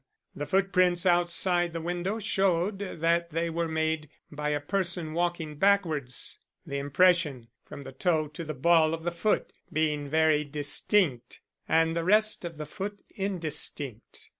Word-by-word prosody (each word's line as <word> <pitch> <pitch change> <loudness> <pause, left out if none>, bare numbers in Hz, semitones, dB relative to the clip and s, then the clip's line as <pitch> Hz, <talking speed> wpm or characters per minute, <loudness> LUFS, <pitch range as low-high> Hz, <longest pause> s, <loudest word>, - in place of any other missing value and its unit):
The 145 0 -5
footprints 185 -2 +2
outside 175 0 +2
the 165 - -3
window 175 +5 -3
showed 195 -2 0
that 170 -3 0
they 165 +1 -2
were 170 +1 -1
made 160 -1 -1 0.2
by 150 0 -3
a 150 0 0
person 175 0 -1
walking 170 -3 -2
backwards; 160 -10 +1 0.3
the 140 0 -4
impression 145 -4 +2 0.2
from 140 - -10
the 135 - -9
toe 155 +3 0
to 155 +3 -7
the 155 -2 -5
ball 160 +2 +3
of 165 - -11
the 175 - -1
foot 190 +5 -1 0.2
being 150 -2 -1
very 155 0 +3
distinct 145 - +1 0.3
and 165 0 +3
the 170 - -1
rest 215 +4 +3
of 165 -2 -7
the 150 - -5
foot 200 +6 -7
indistinct. 155 - -3
165 Hz, 150 wpm, -28 LUFS, 150-180 Hz, 0.3 s, ball